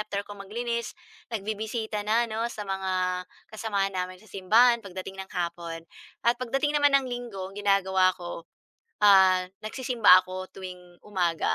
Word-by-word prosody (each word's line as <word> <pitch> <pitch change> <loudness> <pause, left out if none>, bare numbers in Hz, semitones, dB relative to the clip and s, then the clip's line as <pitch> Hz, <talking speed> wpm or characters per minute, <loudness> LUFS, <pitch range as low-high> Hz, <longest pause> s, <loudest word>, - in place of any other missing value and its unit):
after 210 -1 -3
ko 205 - -10
maglinis 235 +4 -4 0.4
nagbibisita 220 +1 -3
na 225 +3 +2
'no, 220 +1 -2
sa 210 - -6
mga 185 -1 -1 0.3
kasamahan 200 -3 -1
namin 185 0 -3
sa 220 - -19
simbahan 230 +6 +4
pagdating 190 0 -7
ng - - -27
hapon. 170 -1 -4 0.4
At 235 +1 +4
pagdating 270 +4 0
naman 290 -1 +4
ng 270 -1 0
Linggo 235 -6 -5
ginagawa 190 -2 +3
ako, 175 -2 -8 0.6
ah, 190 -2 +6 0.2
nagsisimba 230 -4 +5
ako 185 0 -6
tuwing 180 -2 -10
umaga, 175 -5 0
195 Hz, 140 wpm, -27 LUFS, 185-225 Hz, 0.6 s, ah